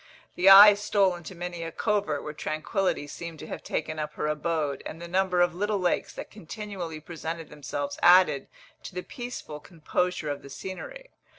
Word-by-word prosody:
The 185 Hz, +2 st, +4 dB
eye 205 Hz, +2 st, +11 dB
stole 200 Hz, -2 st, +2 dB
into 175 Hz, +2 st, -10 dB
many 175 Hz, 0 st, -5 dB
a 165 Hz, 0 st, -5 dB
covert 205 Hz, -7 st, -1 dB
where 150 Hz, -, -6 dB
tranquillity 155 Hz, +3 st, -2 dB
seemed 165 Hz, +2 st, -8 dB
to -, -, -9 dB
have -, -, -7 dB
taken 155 Hz, 0 st, -3 dB
up 150 Hz, -, -4 dB
her -, -, -3 dB
abode, 150 Hz, -1 st, -1 dB
and 165 Hz, -, -7 dB
the 170 Hz, -, -7 dB
number 180 Hz, 0 st, +1 dB
of 175 Hz, -1 st, +3 dB
little 205 Hz, +3 st, -1 dB
lakes 180 Hz, -2 st, 0 dB
that -, -, -8 dB
continually 195 Hz, -4 st, -7 dB
presented 165 Hz, 0 st, -6 dB
themselves 145 Hz, -1 st, -5 dB
added 175 Hz, -6 st, +5 dB, 0.3 s
to -, -, -10 dB
the 180 Hz, -, -3 dB
peaceful 240 Hz, -11 st, -7 dB
composure 165 Hz, +1 st, -2 dB
of 145 Hz, -, -5 dB
the 140 Hz, -, -12 dB
scenery. -, -, -8 dB
175 Hz, 180 wpm, -27 LUFS, 155-195 Hz, 0.3 s, eye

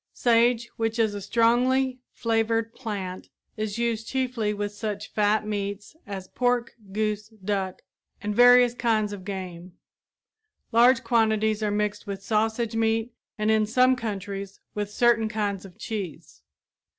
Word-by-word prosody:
Sage, 235 Hz, 0 st, +3 dB
which 225 Hz, 0 st, -1 dB
is 220 Hz, -2 st, +2 dB
a 205 Hz, -, -5 dB
strongly 250 Hz, +4 st, +2 dB
flavored 225 Hz, 0 st, 0 dB
plant, 195 Hz, -6 st, -5 dB, 0.3 s
is 215 Hz, -1 st, -3 dB
used 230 Hz, -1 st, -1 dB
chiefly 255 Hz, -5 st, -1 dB
with 205 Hz, 0 st, -3 dB
such 210 Hz, -1 st, -5 dB
fat 210 Hz, 0 st, +2 dB
meats 205 Hz, +2 st, -4 dB
as 190 Hz, -2 st, -6 dB
pork, 245 Hz, -1 st, 0 dB, 0.2 s
goose, 210 Hz, 0 st, -1 dB
duck, 195 Hz, -3 st, -4 dB, 0.4 s
and 210 Hz, 0 st, -3 dB
various 245 Hz, 0 st, +7 dB
kinds 220 Hz, -4 st, 0 dB
of 195 Hz, -2 st, -8 dB
game. 185 Hz, -2 st, -6 dB, 1.0 s
Large 245 Hz, +3 st, +5 dB
quantities 220 Hz, -2 st, +2 dB
are 210 Hz, -, +1 dB
mixed 205 Hz, 0 st, -2 dB
with 195 Hz, -1 st, -5 dB
sausage 220 Hz, +2 st, 0 dB
meat 225 Hz, +1 st, +1 dB, 0.2 s
and, 215 Hz, 0 st, +1 dB
in 215 Hz, -1 st, +3 dB
some 255 Hz, +3 st, +4 dB
countries, 200 Hz, -4 st, -5 dB
with 205 Hz, -1 st, -3 dB
certain 230 Hz, -1 st, +3 dB
kinds 205 Hz, -3 st, -2 dB
of 180 Hz, -2 st, -14 dB
cheese. 175 Hz, -, -6 dB
215 Hz, 140 wpm, -26 LUFS, 205-235 Hz, 1.0 s, various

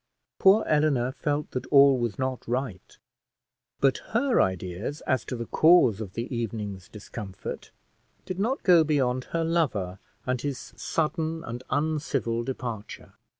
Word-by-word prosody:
Poor 200 Hz, +3 st, +6 dB
Eleanor 150 Hz, -5 st, +2 dB
felt 145 Hz, +2 st, -2 dB
that 125 Hz, -, -4 dB
all 140 Hz, -1 st, +7 dB
was 120 Hz, -3 st, -2 dB
not 130 Hz, -1 st, -3 dB
right, 120 Hz, -6 st, -4 dB, 0.8 s
but 135 Hz, -1 st, +3 dB, 0.2 s
her 255 Hz, 0 st, +3 dB
ideas 95 Hz, -, -2 dB
as 130 Hz, -, 0 dB
to 125 Hz, -, -5 dB
the 115 Hz, -1 st, -4 dB
cause 140 Hz, -, +5 dB
of 100 Hz, -3 st, -6 dB
the 120 Hz, +2 st, -4 dB
evening's 105 Hz, -5 st, -4 dB
discomfort 105 Hz, -2 st, -7 dB, 0.6 s
did 185 Hz, 0 st, -5 dB
not 240 Hz, +7 st, 0 dB
go 175 Hz, -4 st, +6 dB
beyond 130 Hz, -5 st, +1 dB
her 165 Hz, 0 st, -2 dB
lover, 110 Hz, -, 0 dB, 0.3 s
and 125 Hz, -1 st, -1 dB
his 140 Hz, -2 st, -5 dB
sudden 160 Hz, 0 st, -2 dB
and 120 Hz, -4 st, -6 dB
uncivil 145 Hz, -6 st, 0 dB
departure. 120 Hz, -4 st, -6 dB
130 Hz, 140 wpm, -27 LUFS, 115-155 Hz, 0.8 s, all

